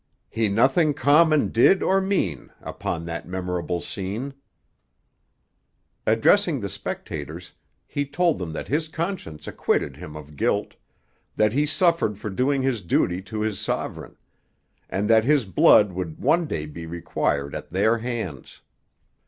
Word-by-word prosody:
He 110 -1 +1
nothing 135 - +3
common 150 +3 +4
did 155 +11 +4
or 195 +1 +3
mean 180 - -1
Upon 85 -1 -4
that 85 0 -6
memorable 90 -1 -3
scene 105 +9 -4 1.7
Addressing 145 - +4
the 100 -3 -4
spectators, 80 +1 -6 0.3
he 145 0 -3
told 165 +3 +1
them 85 -3 -4
that - - -5
his 155 +3 0
conscience 160 - -5
acquitted - - -1
him 75 - -9
of 75 -1 -10
guilt; - - 0 0.6
that 105 0 +2
he 145 +3 +2
suffered 165 - +2
for 105 0 -5
doing 130 +6 +1
his 130 -5 0
duty 90 +1 +1
to 105 +3 -5
his 110 -3 -1
sovereign; - - -4 0.7
and 100 +3 -1
that 110 0 +5
his 140 -1 +3
blood 100 +2 +5
would 90 -3 -5
one 160 +4 +2
day 75 - -3
be 80 +2 -8
required 70 -4 -2
at - - -6
their 110 +6 +2
hands. 110 - -5
110 Hz, 140 wpm, -24 LUFS, 85-145 Hz, 1.7 s, that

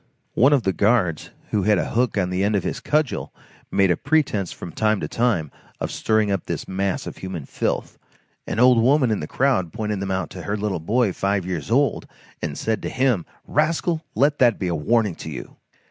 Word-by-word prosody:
One 135 +5 +5
of 140 -5 +3
the 95 - +1
guards, 100 -7 +1 0.2
who 105 - +2
had 105 +1 +3
a - - -2
hook 120 -1 +1
on 90 -2 0
the 90 +1 0
end 105 +1 +2
of 100 - 0
his - - -3
cudgel, 150 -2 0 0.4
made 95 -2 +3
a - - +3
pretence 135 - 0
from 85 - -8
time 110 +3 +1
to - - -3
time, 110 - 0 0.3
of - - -3
stirring 110 -2 +1
up 95 -3 -2
this - - -4
mass 95 0 -2
of - - -7
human 95 -6 -6
filth. - - -3 0.5
An - - -2
old 125 -1 +6
woman 130 0 +4
in 105 - 0
the 75 - -5
crowd 110 -11 +1
pointed 105 -2 -3
them 100 0 -3
out 95 -2 -2
to 90 - -7
her 100 +3 -2
little 100 -4 -2
boy 105 +4 +1
five 100 -1 0
years 85 -6 -4
old, - - +1 0.3
and 75 - -3
said 110 -2 -1
to - - -3
him: 125 -9 +1 0.2
"Rascal, 160 +2 0
let 145 +2 +2
that 120 -4 +4
be 90 - -2
a - - 0
warning 105 +5 +1
to - - -7
you!" 75 - -8
105 Hz, 215 wpm, -23 LUFS, 95-125 Hz, 0.5 s, old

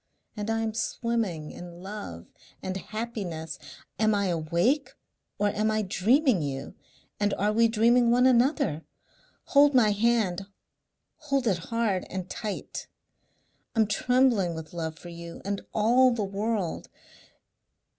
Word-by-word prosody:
And 210 +1 -4
I 225 0 +1
am 220 -1 -2
swimming 220 -7 -2
in 175 0 -10
love 190 - -7 0.4
and 185 0 -3
happiness. 195 -6 -5 0.4
Am 215 -1 +3
I 200 -2 +1
awake 170 - +1 0.5
or 205 0 +2
am 215 +2 0
I 215 0 +1
dreaming 220 - +3
you, 140 -1 -4 0.5
and 205 -1 +1
are 210 +2 +1
we 230 +1 +5
dreaming 235 +2 +4
one 245 +2 +4
another? 255 - +3 0.7
Hold 285 0 +5
my 220 -4 +5
hand 205 -3 +1 0.7
hold 275 -4 -1
it 185 -6 0
hard 230 -5 0
and 185 -1 -4
tight. 210 +1 -5 0.9
I'm 220 -1 +4
trembling 215 -4 +2
with 160 0 -8
love 160 -2 -4
for 175 - -10
you 170 0 -9
and 200 0 -2
all 240 +4 +4
the 235 -4 -1
world.... 200 -2 -2
210 Hz, 135 wpm, -27 LUFS, 180-235 Hz, 0.9 s, we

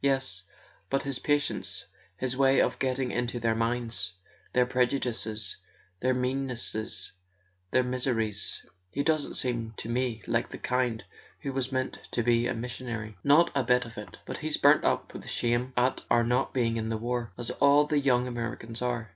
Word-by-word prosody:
"Yes; 130 -9 +1 0.5
but 135 - +1
his 140 -2 -1
patience, 145 -1 0 0.3
his 130 +2 -1
way 135 0 +4
of - - +2
getting 130 -1 0
into 120 0 -1
their 115 -1 +2
minds, 115 -5 -1 0.4
their 125 0 +4
prejudices, 125 -4 0 0.4
their 130 0 +2
meannesses, 125 -4 -2 0.6
their 130 +6 +3
mis¬ 125 +1 -1
eries! 110 -5 -1 0.2
He 140 +8 -1
doesn't 155 -2 +1
seem 115 -3 -1
to - - -5
me 120 -1 -1
like 115 0 0
the - - -7
kind 125 -3 0 0.4
who 140 - -3
was 135 0 -1
meant 130 0 -1
to 120 - +1
be 120 0 +3
a - - -1
missionary." 115 -2 -5
"Not 155 +4 +6
a 140 -2 +2
bit 125 +1 +3
of 115 -1 -10
it... 100 -4 -9
But - - -5
he's - - -1
burnt - - +6
up - - 0
with - - -8
shame 120 +2 +1
at 125 +1 +2
our 120 0 +5
not 125 +2 +1
being 115 -3 +1
in 110 0 -2
the 110 - 0
war—as 120 0 -3
all 145 +1 +6
the 150 0 +2
young 125 -3 +3
Americans 115 -1 -4
are." 120 -2 -1
125 Hz, 175 wpm, -29 LUFS, 115-130 Hz, 0.6 s, Not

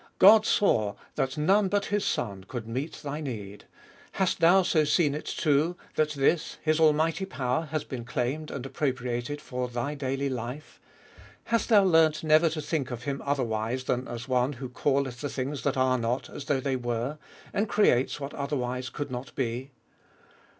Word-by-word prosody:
God 215 +2 +8
saw 110 - +2 0.2
that 130 +1 -2
none 195 +7 +3
but 200 +1 0
His 205 - +2
Son 100 -5 -2
could 120 -1 -6
meet 130 +7 -3
thy 150 +1 -4
need: 105 -8 -6 0.5
hast 190 -2 0
thou 175 +3 +6
so 160 -3 +3
seen 150 -1 +2
it, 150 - -5
too, 155 +4 +1 0.2
that 155 -1 +2
this, 150 +4 +1
His 155 0 +2
almighty 160 +3 +3
power, 130 -2 -1
has 155 0 -3
been 125 -3 -6
claimed 130 +6 -2
and 135 -2 -5
appropriated 130 0 -2
for 125 -2 -4
thy 120 +4 -3
daily 135 -1 -2
life? 130 +3 -6 0.6
Hast 230 +1 0
thou 210 -3 +7
learnt 160 -4 +4
never 155 +1 +5
to 155 -1 -4
think 145 -3 -2
of 120 -1 -6
Him 140 -1 -3
otherwise 125 -3 -1
than 125 0 -1
as 120 -1 -6
the 135 - -10
One 125 +2 +2
who 130 0 -7
calleth 135 -1 0
the 145 - -2
things 135 0 -3
that 140 +2 0
are 130 -1 +2
not 120 +3 -2
as 145 - -7
though 140 -2 +1
they 135 0 -1
were, 120 +4 -3 0.3
and 205 +1 0
creates 135 -11 +3
what 140 0 -5
otherwise 130 -3 -3
could 145 -2 -5
not 125 +2 -6
be 125 +1 -2
140 Hz, 180 wpm, -28 LUFS, 125-155 Hz, 0.6 s, God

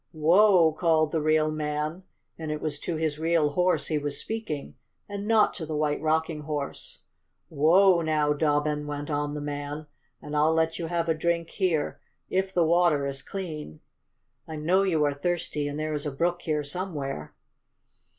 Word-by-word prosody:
"Whoa!" 170 +2 +5
called 155 -1 +2
the 160 - 0
real 155 0 +2
man, 150 +2 -3 0.3
and 160 -1 -6
it 150 - -2
was 150 -2 -3
to 170 - -3
his 155 -2 -1
real 160 -2 +2
horse 180 +4 +2
he 155 -2 0
was 145 -1 -2
speaking, 220 -11 -5 0.3
and 200 0 -5
not 220 -1 +4
to 165 - -5
the 155 - -3
White 150 -1 0
Rocking 160 0 0
Horse. 145 -1 -5 0.5
"Whoa 170 +4 +5
now, 155 -2 +1
Dobbin!" 150 0 0
went 145 +1 -4
on 145 0 -1
the 150 - -4
man, 145 +1 -5 0.3
"and 150 - -7
I'll 155 +2 +3
let 160 0 +1
you 165 - -3
have 170 0 -1
a 165 - +3
drink 170 +1 -1
here 170 -6 0 0.3
if 190 0 0
the 175 -3 +2
water 165 -4 +3
is 135 -1 -4
clean. 155 - -6 0.7
I 160 - -6
know 170 +6 +2
you 170 -6 +2
are 145 -1 +2
thirsty, 150 -1 -2
and 145 +1 -4
there 155 0 -2
is 150 0 -2
a - - -2
brook 175 +5 -1
here 150 -2 -1
somewhere." 145 - -5
155 Hz, 180 wpm, -27 LUFS, 150-170 Hz, 0.7 s, Whoa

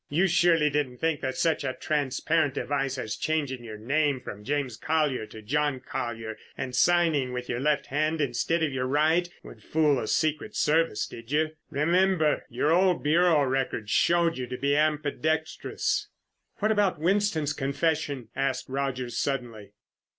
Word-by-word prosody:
You 165 +6 +2
surely 165 -4 +3
didn't 135 -4 -1
think 160 0 -1
that 130 -1 -2
such 165 -3 +1
a 130 -1 -1
transparent 150 +1 0
device 135 -2 -1
as 110 -4 -3
changing 140 -6 -2
your 110 -2 -8
name 140 +4 +1
from 105 -4 -9
'James 140 -2 -2
Collier' 150 -6 0
to 110 0 -11
'John 145 +3 0
Collyer' 120 -4 -5 0.2
and 125 -1 -4
signing 160 -5 +3
with 125 0 -4
your 120 - -2
left 145 +1 +1
hand 155 +3 0
instead 150 +5 0
of 150 -4 0
your 130 -1 -1
right 160 +5 +2
would - - -12
fool 150 -3 +2
the 110 - -4
secret 155 +6 0
service, 155 -8 +2
did 115 +2 -11
you? 155 +1 +1 0.2
Remember, 170 +1 +2
your 150 - 0
old 180 +1 +3
Bureau 160 0 +4
records 130 -5 -1
showed 170 -4 +3
you 125 - -3
to 125 +1 -5
be 140 +2 +1
ambidextrous." 155 +1 0 0.5
"What 215 +1 0
about 205 -5 +2
Winston's 165 -3 +1
confession?" 140 -3 -1
asked 135 -2 -1
Rogers 130 -2 -2
suddenly. 120 -7 -3
145 Hz, 160 wpm, -27 LUFS, 130-160 Hz, 0.5 s, Bureau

